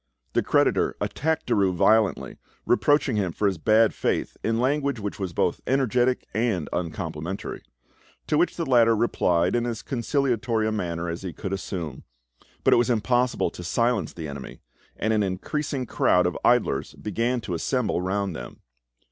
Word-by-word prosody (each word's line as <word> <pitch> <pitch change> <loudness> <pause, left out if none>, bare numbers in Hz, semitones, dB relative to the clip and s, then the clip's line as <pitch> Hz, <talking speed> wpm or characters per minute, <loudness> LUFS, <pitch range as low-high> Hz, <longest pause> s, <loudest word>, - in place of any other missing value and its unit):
The - - +3
creditor - - +2
attacked 160 +1 -1
Derues 95 -3 +2
violently, 110 +3 +2 0.3
reproaching 135 -1 +2
him 95 -4 0
for 105 - -1
his 95 -4 +1
bad 110 +5 +4
faith - - -1
in 115 0 0
language 140 0 0
which 105 -1 -5
was 95 -3 -3
both - - 0
energetic 125 -1 +1
and 110 -8 0
uncomplimentary; 85 +1 -4 0.6
to - - 0
which 170 +4 +2
the 165 - -2
latter 115 -4 +5
replied 90 -5 +1
in 120 0 0
as 115 -2 -4
conciliatory 120 -3 0
a - - 0
manner 85 -5 -3
as 85 +1 -4
he 95 -3 -5
could 95 -2 -5
assume. 90 -7 -5 0.6
But - - +5
it - - +5
was 120 0 +2
impossible 120 -3 +1
to 90 - -9
silence 115 -2 0
the 80 -3 -6
enemy, 70 -2 -8 0.4
and 110 +2 0
an 110 - +2
increasing 130 +8 -2
crowd 90 -5 +2
of 90 - 0
idlers 105 - +2
began 115 +4 -1
to 95 - -5
assemble 110 +3 0
round 95 -1 -1
them. - - -9
110 Hz, 165 wpm, -25 LUFS, 90-125 Hz, 0.6 s, latter